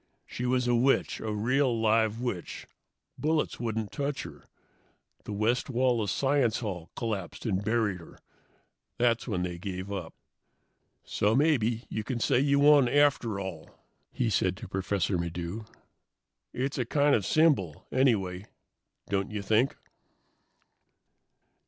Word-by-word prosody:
"She 125 Hz, -, -4 dB
was 125 Hz, 0 st, +1 dB
a 120 Hz, -, +3 dB
witch, 125 Hz, +3 st, +2 dB
a 110 Hz, -, -3 dB
real, 120 Hz, +3 st, +1 dB
live 110 Hz, 0 st, +2 dB
witch. 120 Hz, -8 st, -4 dB, 0.5 s
Bullets 155 Hz, 0 st, 0 dB
wouldn't 110 Hz, -3 st, -3 dB
touch 140 Hz, 0 st, -3 dB
her. -, -, -11 dB, 0.8 s
The -, -, -6 dB
west 110 Hz, +6 st, 0 dB
wall 125 Hz, -2 st, +2 dB
of 105 Hz, -, -2 dB
Science 135 Hz, -2 st, +1 dB
Hall 90 Hz, -7 st, -5 dB
collapsed 105 Hz, -5 st, -4 dB
and 100 Hz, -3 st, 0 dB
buried 110 Hz, -3 st, 0 dB
her. 85 Hz, -, -14 dB, 0.8 s
That's 120 Hz, 0 st, +1 dB
when 95 Hz, -6 st, -1 dB
they 90 Hz, -1 st, -4 dB
gave 95 Hz, 0 st, -5 dB
up. 90 Hz, -5 st, -5 dB, 0.9 s
"So 105 Hz, +2 st, +1 dB
maybe 125 Hz, -6 st, +2 dB
you 110 Hz, -, -4 dB
can 125 Hz, +1 st, -3 dB
say 125 Hz, +3 st, +2 dB
you 140 Hz, +1 st, +3 dB
won, 145 Hz, -3 st, +6 dB
after 135 Hz, -8 st, +2 dB
all," 95 Hz, -5 st, -6 dB, 0.4 s
he 120 Hz, -3 st, -1 dB
said 95 Hz, -2 st, +1 dB
to -, -, -8 dB
Professor 95 Hz, 0 st, -1 dB
Maddox. 85 Hz, +5 st, -5 dB, 0.8 s
"It's 135 Hz, +2 st, -2 dB
a 125 Hz, -, 0 dB
kind 145 Hz, +3 st, +2 dB
of 105 Hz, -, +2 dB
symbol, 140 Hz, -, +2 dB
anyway, 100 Hz, -8 st, +1 dB, 0.6 s
don't 100 Hz, 0 st, -1 dB
you 105 Hz, -2 st, -4 dB
think?" 110 Hz, +6 st, +2 dB
110 Hz, 140 wpm, -28 LUFS, 100-130 Hz, 0.9 s, won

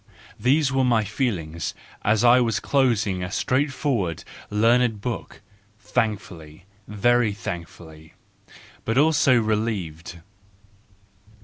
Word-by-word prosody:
—These 135 Hz, +2 st, +2 dB
were 135 Hz, 0 st, +1 dB
my 120 Hz, -4 st, +2 dB
feelings 95 Hz, -, -3 dB, 0.3 s
as 105 Hz, +2 st, +2 dB
1 125 Hz, +1 st, +6 dB
was 115 Hz, -5 st, 0 dB
closing 115 Hz, -9 st, +1 dB
a 90 Hz, -, -4 dB
straightforward, 130 Hz, -, -1 dB, 0.3 s
learned 115 Hz, +1 st, +2 dB
book, 115 Hz, +2 st, -6 dB, 0.4 s
thankful, 100 Hz, -10 st, -3 dB, 0.3 s
very 115 Hz, +1 st, +2 dB
thankful, 85 Hz, -4 st, -8 dB, 0.8 s
but 115 Hz, +2 st, -1 dB
also 145 Hz, -4 st, +4 dB
relieved. 105 Hz, -7 st, -3 dB
110 Hz, 95 wpm, -23 LUFS, 95-125 Hz, 0.8 s, 1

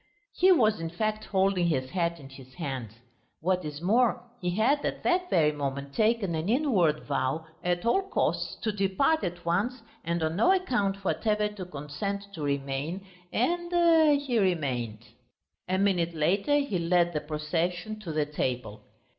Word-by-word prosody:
He 375 Hz, +1 st, +5 dB
was, 220 Hz, -, +4 dB
in 165 Hz, 0 st, -3 dB
fact, 215 Hz, +4 st, -2 dB
holding 190 Hz, -2 st, +2 dB
his 130 Hz, -5 st, -1 dB
hat 170 Hz, -2 st, -1 dB
in 135 Hz, -, -11 dB
his 130 Hz, -1 st, -14 dB
hands. 135 Hz, -, -5 dB, 0.5 s
What 180 Hz, +2 st, 0 dB
is 150 Hz, +1 st, -6 dB
more, 230 Hz, +6 st, +3 dB, 0.2 s
he 180 Hz, -1 st, -1 dB
had 275 Hz, +8 st, +2 dB
at -, -, -3 dB
that 360 Hz, 0 st, +1 dB
very 155 Hz, -3 st, +4 dB
moment 140 Hz, -1 st, -4 dB
taken 215 Hz, -3 st, +1 dB
an 160 Hz, +4 st, -2 dB
inward 210 Hz, -, +2 dB
vow 140 Hz, +3 st, -1 dB, 0.2 s
at 175 Hz, +1 st, 0 dB
all 310 Hz, +12 st, +3 dB
costs -, -, 0 dB
to 220 Hz, -, 0 dB
depart 205 Hz, +11 st, +1 dB
at 175 Hz, -1 st, -4 dB
once 220 Hz, +9 st, 0 dB, 0.2 s
and 170 Hz, 0 st, -1 dB
on 160 Hz, +2 st, -1 dB
no 365 Hz, -, +5 dB
account 205 Hz, -, 0 dB
whatever 210 Hz, +1 st, +1 dB
to 205 Hz, -3 st, -7 dB
consent 195 Hz, +6 st, -5 dB
to 160 Hz, -, -7 dB
remain, 140 Hz, +6 st, -2 dB, 0.3 s
and... 335 Hz, 0 st, +3 dB
he 255 Hz, -5 st, 0 dB
remained. 130 Hz, -, -1 dB, 0.6 s
A 185 Hz, +1 st, +1 dB
minute 180 Hz, -4 st, +1 dB
later 195 Hz, -, +2 dB
he 280 Hz, -11 st, 0 dB
led 175 Hz, 0 st, +2 dB
the 150 Hz, -, -1 dB
procession 170 Hz, +7 st, -2 dB
to 185 Hz, -6 st, -6 dB
the 155 Hz, -1 st, 0 dB
table. 125 Hz, -7 st, -3 dB
180 Hz, 165 wpm, -28 LUFS, 150-215 Hz, 0.6 s, He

